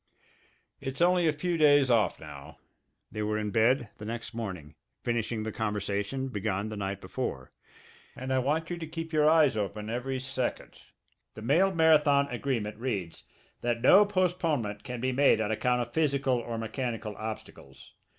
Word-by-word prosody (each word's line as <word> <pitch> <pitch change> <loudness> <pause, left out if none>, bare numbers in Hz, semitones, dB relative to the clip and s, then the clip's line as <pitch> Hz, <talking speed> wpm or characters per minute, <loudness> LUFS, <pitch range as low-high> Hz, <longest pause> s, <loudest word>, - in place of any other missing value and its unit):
"It's 135 0 -6
only 175 0 +4
a - - +4
few 170 +3 -2
days 145 -3 +5
off 115 -3 +2
now" 70 -1 -11 0.5
they 110 - -4
were 105 0 0
in 105 -1 -2
bed 115 +2 +2
the 105 - -7
next 115 +1 -5
morning, 95 -10 -6 0.3
finishing 115 -2 -1
the 110 - -3
conversation 105 +4 -2
begun 105 -2 -2
the 110 - -5
night 100 -1 -3
before 65 0 -5 0.6
"and 130 +1 -3
I 130 - +3
want 155 +6 -1
you 175 - -2
to 160 - -5
keep 165 0 -6
your 150 0 +4
eyes 155 -6 +4
open 105 +1 -3
every 130 +2 -2
second! 130 -1 -4 0.5
The 110 - -9
mail 170 +11 +3
marathon 150 -4 +4
agreement 120 -5 -2
reads 105 -9 -4 0.4
that 120 -1 -1
no 200 +3 +8
postponement 165 - -1
can 125 -2 -6
be 130 +1 0
made 140 -1 +4
on 110 -1 -1
account 125 +2 +1
of 120 - -12
physical 140 -5 +1
or 115 -1 -5
mechanical 115 -1 -4
obstacles. 110 0 -9
120 Hz, 165 wpm, -29 LUFS, 110-145 Hz, 0.6 s, no